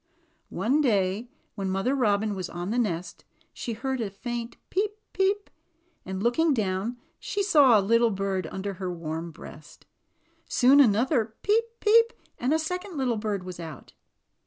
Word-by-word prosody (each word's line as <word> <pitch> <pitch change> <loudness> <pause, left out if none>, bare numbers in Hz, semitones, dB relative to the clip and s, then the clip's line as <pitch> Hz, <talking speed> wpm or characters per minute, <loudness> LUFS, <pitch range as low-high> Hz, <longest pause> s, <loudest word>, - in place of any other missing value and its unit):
One 275 +7 +1
day 210 -2 +1 0.2
when 195 -2 -3
Mother 195 +8 0
Robin 215 -5 +1
was 185 -3 -4
on 175 +3 -4
the 240 - +1
nest, 180 -6 -2 0.3
she 235 - -4
heard 260 +3 -3
a 215 - -2
faint 235 +4 -5
^^peep, 410 +2 0 0.2
peep!'' 395 +2 0 0.6
and 190 +1 -4
looking 285 +6 +3
down 205 +2 -1 0.2
saw 295 - +4
a - - +2
little 230 +4 +3
bird 195 -3 -2
under 195 +4 -4
her 185 -1 -2
warm 165 0 -5
breast. 155 0 -13 0.6
Soon 270 +3 +5
came 270 -5 +8
another 225 +1 +1
^^peep, 425 +3 +4 0.2
peep!" 460 +2 +5 0.3
and 250 +3 0
a 315 - +4
second 360 +2 -4
little 250 -4 0
bird 210 -3 -2
was 180 -1 -8
out. 160 -5 -9
225 Hz, 160 wpm, -27 LUFS, 190-275 Hz, 0.6 s, came